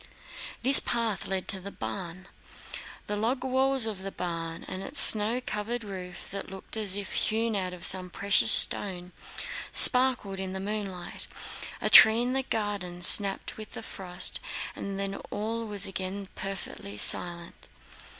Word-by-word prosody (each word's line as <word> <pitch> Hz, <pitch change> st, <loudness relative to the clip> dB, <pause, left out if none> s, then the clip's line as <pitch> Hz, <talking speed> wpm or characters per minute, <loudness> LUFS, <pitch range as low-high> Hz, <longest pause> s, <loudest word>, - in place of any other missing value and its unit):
This 270 Hz, +2 st, +8 dB
path 230 Hz, -5 st, -3 dB
led 190 Hz, -1 st, -4 dB
to 195 Hz, -, +2 dB
the 195 Hz, +2 st, -10 dB
barn. 185 Hz, -2 st, -8 dB, 0.8 s
The 210 Hz, -, -5 dB
log 240 Hz, +5 st, -3 dB
walls 265 Hz, -1 st, +1 dB
of 210 Hz, -4 st, -5 dB
the 195 Hz, +1 st, -8 dB
barn 165 Hz, -2 st, -7 dB
and 185 Hz, -, -7 dB
its -, -, -3 dB
snow 220 Hz, +3 st, +5 dB
covered 225 Hz, +3 st, -5 dB
roof, 185 Hz, -3 st, -11 dB
that 200 Hz, +1 st, -8 dB
looked 195 Hz, +3 st, -10 dB
as 205 Hz, -3 st, 0 dB
if 200 Hz, -1 st, -7 dB
hewn 225 Hz, 0 st, -3 dB
out 185 Hz, -2 st, -4 dB
of 180 Hz, -1 st, -9 dB
some 185 Hz, 0 st, -1 dB
precious 200 Hz, +4 st, +3 dB
stone, 180 Hz, -4 st, +4 dB, 0.6 s
sparkled 250 Hz, -7 st, +5 dB
in 190 Hz, -1 st, -6 dB
the 190 Hz, -, -6 dB
moonlight. 195 Hz, -3 st, -6 dB, 0.5 s
A -, -, -1 dB
tree 220 Hz, +2 st, +7 dB
in 250 Hz, +1 st, -3 dB
the 265 Hz, -, 0 dB
garden 205 Hz, -7 st, -5 dB
snapped 195 Hz, +1 st, +5 dB
with 215 Hz, -1 st, -12 dB
the -, -, -10 dB
frost, 180 Hz, -1 st, -3 dB, 0.4 s
and 200 Hz, -1 st, -8 dB
then 195 Hz, 0 st, -5 dB
all 225 Hz, +2 st, -5 dB
was 205 Hz, -1 st, +2 dB
again 190 Hz, +1 st, -7 dB
perfectly 190 Hz, -, -8 dB
silent. 170 Hz, +9 st, -1 dB
200 Hz, 155 wpm, -25 LUFS, 185-220 Hz, 0.8 s, This